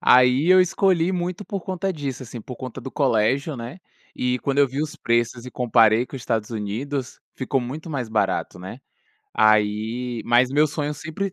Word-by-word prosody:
Aí, 125 +5 +5
eu 185 0 +8
escolhi 180 -1 +2
muito 180 +3 -3
por 200 -1 -4
conta 190 +1 -2
disso, 140 -5 -5
assim, 120 -1 -8
por 125 +2 -9
conta 130 0 -7
do 130 - -7
colégio, 135 +3 +1
né, 120 +10 -8 0.3
e 125 0 0
quando 140 0 -1
eu 140 -2 +5
vi 135 +3 -3
os 155 -1 -3
preços 120 +1 0
e 125 - -8
comparei 115 -1 +3
com - - -12
os 130 - -6
Estados 115 -3 -2
Unidos, 120 +5 -4 0.2
ficou 130 0 -1
muito 150 +7 -6
mais 125 -5 -3
barato, 110 -4 -1
né? 95 +8 -8 0.5
Aí 110 +3 +1
Mas 120 +2 +4
meu 150 +3 +4
sonho 150 0 -3
sempre 160 +6 -4
130 Hz, 185 wpm, -23 LUFS, 115-150 Hz, 0.5 s, eu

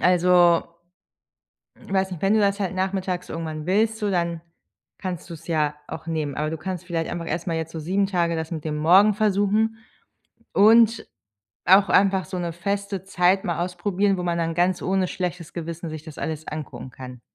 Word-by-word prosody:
Also, 180 -1 +5 1.1
weiß 190 -1 -1
nicht, 180 -1 -7
wenn 195 +2 +3
du 220 - +4
das 200 0 +1
halt 190 -1 -1
nachmittags 185 -1 -2
irgendwann 160 -2 -5
willst, 215 +4 +2
so, 210 -2 -1
dann 170 -2 -1 0.6
kannst 180 -2 -5
du's 165 -1 -9
ja 150 -3 0
auch - - -7
nehmen. 155 -4 -2
Aber 150 +1 -2
du 160 - -4
kannst 180 +2 -5
vielleicht 165 -2 -2
einfach 170 -1 -4
erst 170 +1 -3
mal 165 -2 -1
jetzt 160 0 -4
so 160 - -5
7 190 +5 +1
Tage 170 -4 0
das 160 0 -4
mit 160 -3 -5
dem 155 -1 -2
Morgen 185 +7 +5
versuchen 210 +1 +1 0.7
und 225 +2 +5 0.6
auch 195 +2 +6
einfach 190 -1 +3
so 185 - -5
'ne 170 -1 -3
feste 200 +2 -3
Zeit 190 0 +2
mal 170 -1 -1
ausprobieren, 190 +2 0
wo 180 - -3
man 170 -1 0
dann 165 0 -1
ganz 175 +1 +1
ohne 190 0 +1
schlechtes 180 -2 -4
Gewissen 170 0 -5
sich 155 -1 -7
das 155 -3 -11
alles 160 0 -4
angucken 150 -3 -6
kann. 125 -1 -10
180 Hz, 185 wpm, -24 LUFS, 165-195 Hz, 1.1 s, auch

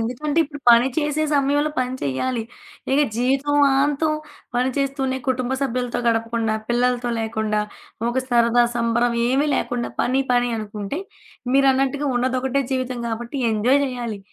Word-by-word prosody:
ఎందుకంటే, 255 +7 -2
ఇప్పుడు 290 -1 -10
పని 235 +2 +6
చేసే 300 0 0
సమయంలో 290 +1 +2
పని 255 0 -1
చేయాలి. 225 - -1 0.5
ఇక 280 - +4 0.2
జీవితాంతం 280 +3 +2 0.4
పని 250 +1 +2
చేస్తూనే 270 -1 -1
కుటుంబ 255 0 0
సభ్యులతో 250 -2 -1
గడపకుండా, 230 -1 0
పిల్లలతో 245 0 +1
లేకుండా, 220 -1 -1 0.5
ఒక 260 - 0
సరదా, 240 0 +4
సంబరం 235 +1 +1
ఏమీ 275 +4 +2
లేకుండా 245 -1 -2
పని 260 +2 +1
పని 245 0 +2
అనుకుంటే, 210 - -5 0.6
మీరన్నట్టుగా 275 +1 +2
ఉన్నది 255 +1 0
ఒకటే 265 +2 0
జీవితం 255 -1 -2
గాబట్టి 235 +4 -4 0.2
ఎంజాయ్ 245 +6 +3
చేయాలి. 240 -4 -4
250 Hz, 130 wpm, -22 LUFS, 235-275 Hz, 0.6 s, పని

